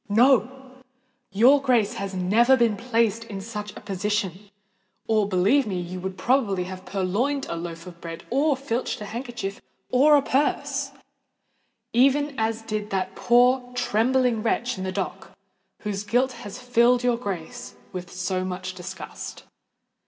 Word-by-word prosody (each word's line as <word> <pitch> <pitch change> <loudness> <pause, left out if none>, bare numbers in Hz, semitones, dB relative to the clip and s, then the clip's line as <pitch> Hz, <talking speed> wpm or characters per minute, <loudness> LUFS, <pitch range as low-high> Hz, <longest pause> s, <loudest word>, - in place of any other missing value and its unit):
No—your 260 +1 +2
Grace 245 -6 +2
has 195 -1 -5
never 225 +8 +4
been 230 -3 +3
placed 230 -1 0
in 200 -4 -6
such 210 0 -6
a - - -9
position; 200 0 -2 0.6
or, 215 -2 +2
believe 205 +8 +3
me, 185 -3 -2
you 175 +1 -5
would 190 +1 -5
probably 205 -3 +1
have 185 +1 -8
purloined 205 +10 -1
a - - -3
loaf 165 0 -6
of 175 -2 -12
bread 165 -1 -7
or 280 +2 +2
filched 260 -2 -2
a - - -4
handkerchief 235 -3 -5 0.3
or 290 +4 +6
a 285 - +4
purse—even 275 0 -1
as 225 0 -1
did 215 -1 -3
that 190 -1 -2
poor 245 +4 +4
trembling 245 0 +2
wretch 240 +2 0
in 190 - -5
the 185 - -2
dock, - - -5 0.4
whose 205 -2 -3
guilt 245 +5 +1
has 230 -3 -9
filled 245 0 +3
your 245 -1 +3
Grace 195 -8 -6 0.2
with 180 -1 -6
so 185 0 -2
much 185 0 -4
disgust! 180 0 -8
220 Hz, 145 wpm, -25 LUFS, 190-250 Hz, 0.6 s, or